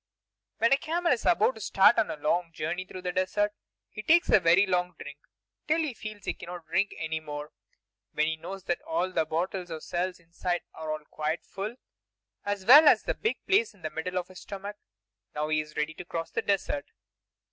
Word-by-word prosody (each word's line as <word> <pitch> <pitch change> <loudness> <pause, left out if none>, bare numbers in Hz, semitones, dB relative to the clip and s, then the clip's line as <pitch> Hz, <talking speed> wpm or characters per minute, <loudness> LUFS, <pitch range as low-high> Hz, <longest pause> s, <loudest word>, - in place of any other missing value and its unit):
When 230 +3 +4
a - - +5
camel 340 +4 0
is 245 -4 +1
about 205 +9 +4
to 220 - -11
start 195 +4 +5
on 220 - +1
a - - -3
long 165 +3 0
journey 165 +4 -3
through 185 -1 -9
the 180 - -1
desert, 195 +3 +1 0.4
he 215 - -6
takes 340 +9 +4
a 215 - +7
very 175 +3 +5
long 180 -2 0
drink, 145 0 -9 0.5
till 310 +1 +3
he 310 -5 -1
feels 215 -2 -8
that - - -16
he - - 0
cannot 175 -1 -9
drink 190 +5 0
any 160 0 -2
more; 150 -1 -7 0.6
then 155 - +1
he 160 0 0
knows 190 +4 -8
that 175 - -1
all 310 - -1
the 160 - +1
bottles 175 +3 -2
or 160 -1 -5
cells 180 +3 -2
inside 175 +1 -3
are 155 -1 -3
quite 155 +2 -2
full, 200 +5 -5 0.7
as 205 -2 -3
well 300 +7 +10
as - - +6
the - - 0
big 440 - -2
place 405 - +2
in 185 - -23
the 155 - -3
middle 180 +4 -3
of 180 0 -2
his 185 - -11
stomach. 200 +1 -7 0.6
Now 150 +1 -1
he 155 0 +2
is 150 0 -12
ready 150 +1 0
to 180 - -8
cross 165 -1 -4
the - - -1
desert. 200 +8 -1
180 Hz, 210 wpm, -28 LUFS, 160-205 Hz, 0.7 s, well